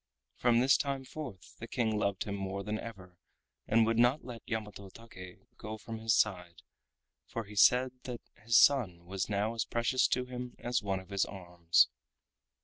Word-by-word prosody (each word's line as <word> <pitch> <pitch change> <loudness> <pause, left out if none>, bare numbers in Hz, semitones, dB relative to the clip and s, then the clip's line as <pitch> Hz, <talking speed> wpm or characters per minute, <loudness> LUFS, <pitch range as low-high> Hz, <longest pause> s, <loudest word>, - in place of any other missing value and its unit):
From 120 -1 +3
this 135 +2 +5
time 135 -2 -3
forth 130 - -9
the 115 - -7
King 115 -4 0
loved 100 -2 0
him 100 - -5
more 100 0 -4
than 105 +1 -3
ever 95 -6 -10 0.5
and 115 +1 +4
would 115 +1 +1
not 120 +5 +3
let 120 -2 -8
Yamato 105 -3 -5
Take 95 -4 -12 0.2
go 110 0 -6
from 110 +1 -7
his 110 -1 +2
side, 90 -5 0 0.6
for 115 - -4
he 105 0 -12
said 125 +5 +5
that 125 -2 -6 0.2
his 115 +1 +4
son 95 -12 +4
was 95 +2 -3
now 105 +2 0
as 115 -2 -1
precious 120 +2 +1
to 125 0 0
him 125 -1 -7
as 120 0 -1
one 100 -2 -2
of 95 - -14
his 100 -1 +1
arms. 85 -2 +2
110 Hz, 180 wpm, -32 LUFS, 95-120 Hz, 0.6 s, this